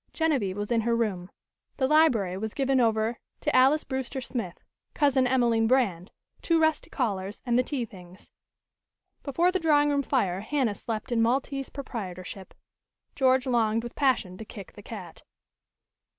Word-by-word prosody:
Genevieve 265 Hz, -, 0 dB
was 205 Hz, +2 st, -4 dB
in 230 Hz, -1 st, +3 dB
her 235 Hz, +1 st, +1 dB
room. 195 Hz, -6 st, -2 dB, 0.5 s
The 265 Hz, -, +2 dB
library 255 Hz, -, +3 dB
was 215 Hz, +3 st, -5 dB
given 270 Hz, -2 st, +2 dB
over 225 Hz, 0 st, +1 dB, 0.2 s
to -, -, 0 dB
Alys 270 Hz, +4 st, +5 dB
Brewster 265 Hz, 0 st, -4 dB
Smith, 235 Hz, -8 st, -5 dB, 0.4 s
Cousin 270 Hz, -3 st, +3 dB
Emelene 235 Hz, -3 st, +2 dB
Brand, 210 Hz, -9 st, +1 dB, 0.3 s
two 335 Hz, -1 st, +2 dB
rusty 315 Hz, -2 st, +1 dB
callers 200 Hz, -6 st, -2 dB
and 240 Hz, -2 st, +1 dB
the 250 Hz, -, +5 dB
tea 255 Hz, -1 st, -3 dB
things. 185 Hz, -3 st, -15 dB, 0.9 s
Before 335 Hz, +6 st, +1 dB
the 375 Hz, -, 0 dB
drawing 295 Hz, -3 st, +3 dB
room 285 Hz, -1 st, +2 dB
fire, 200 Hz, -10 st, 0 dB
Hanna 240 Hz, +1 st, 0 dB
slept 220 Hz, +3 st, -5 dB
in 235 Hz, -1 st, +2 dB
Maltese 270 Hz, +3 st, 0 dB
proprietorship. 190 Hz, -8 st, -7 dB, 0.6 s
George 260 Hz, -1 st, +3 dB
longed 230 Hz, -3 st, +1 dB
with 240 Hz, -, -7 dB
passion 250 Hz, -10 st, 0 dB
to -, -, -6 dB
kick 200 Hz, -3 st, -11 dB
the 205 Hz, -, -12 dB
cat. 190 Hz, -6 st, -9 dB
240 Hz, 155 wpm, -27 LUFS, 205-270 Hz, 0.9 s, Alys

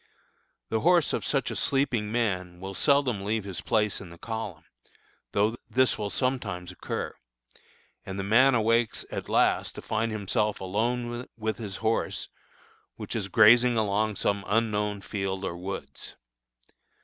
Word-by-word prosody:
The 110 Hz, -, +1 dB
horse 175 Hz, +2 st, +4 dB
of -, -, -1 dB
such 135 Hz, -2 st, 0 dB
a -, -, -4 dB
sleeping 120 Hz, -6 st, +1 dB
man 90 Hz, -7 st, -1 dB
will 95 Hz, +1 st, -6 dB
seldom 130 Hz, -5 st, +2 dB
leave 110 Hz, +1 st, -1 dB
his 95 Hz, -3 st, -6 dB
place 105 Hz, -2 st, +1 dB
in 95 Hz, -, -10 dB
the 85 Hz, -, -12 dB
column, 110 Hz, -6 st, -5 dB, 0.7 s
though 105 Hz, +3 st, +1 dB
this 130 Hz, 0 st, +3 dB
will 105 Hz, -1 st, -3 dB
sometimes 100 Hz, -9 st, -2 dB
occur, 90 Hz, -, -4 dB, 0.9 s
and 95 Hz, 0 st, -6 dB
the 100 Hz, -, -2 dB
man 125 Hz, +6 st, +5 dB
awakes 115 Hz, 0 st, +2 dB
at -, -, -5 dB
last -, -, +2 dB
to -, -, -7 dB
find 110 Hz, +1 st, -1 dB
himself 105 Hz, 0 st, 0 dB
alone 120 Hz, +5 st, -2 dB
with 110 Hz, -2 st, -2 dB
his 100 Hz, -4 st, -5 dB
horse 115 Hz, +1 st, 0 dB, 0.7 s
which -, -, -6 dB
is 105 Hz, -4 st, -1 dB
grazing 115 Hz, +4 st, +6 dB
along 105 Hz, 0 st, +1 dB
some 100 Hz, 0 st, 0 dB
unknown 105 Hz, -2 st, 0 dB
field 95 Hz, -2 st, -3 dB
or 85 Hz, -, -3 dB
woods. 90 Hz, -6 st, -7 dB
105 Hz, 150 wpm, -27 LUFS, 100-115 Hz, 0.9 s, grazing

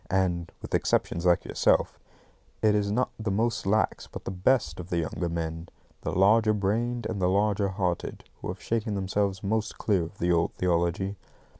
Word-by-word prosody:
And 90 Hz, -3 st, 0 dB
(with -, -, -7 dB
exceptions 85 Hz, +1 st, +1 dB
like 85 Hz, -, +3 dB
yourself) -, -, +2 dB, 0.6 s
it 105 Hz, -1 st, +5 dB
is 105 Hz, -1 st, +1 dB
not 125 Hz, +4 st, +1 dB
the 110 Hz, -1 st, -2 dB
most 110 Hz, +1 st, 0 dB
lax, 110 Hz, +2 st, +1 dB
but -, -, -9 dB
the -, -, -3 dB
BEST 90 Hz, -, +1 dB
of 90 Hz, 0 st, -7 dB
the 85 Hz, -, 0 dB
younger 85 Hz, +1 st, -2 dB
men, 80 Hz, 0 st, -4 dB, 0.3 s
the -, -, -2 dB
larger 110 Hz, +4 st, +4 dB
brained 115 Hz, +4 st, 0 dB
and 105 Hz, -4 st, -3 dB
the 90 Hz, -, +3 dB
larger 100 Hz, +1 st, +2 dB
hearted, 95 Hz, -3 st, -2 dB, 0.2 s
who -, -, -5 dB
have -, -, -5 dB
shaken 110 Hz, -2 st, -1 dB
themselves 95 Hz, 0 st, -1 dB
most 110 Hz, +2 st, -1 dB
clear 100 Hz, -5 st, +1 dB
of 85 Hz, +4 st, -7 dB
the 90 Hz, +1 st, +1 dB
old 85 Hz, -1 st, +1 dB
theology. 90 Hz, +2 st, 0 dB
95 Hz, 180 wpm, -27 LUFS, 85-105 Hz, 0.6 s, it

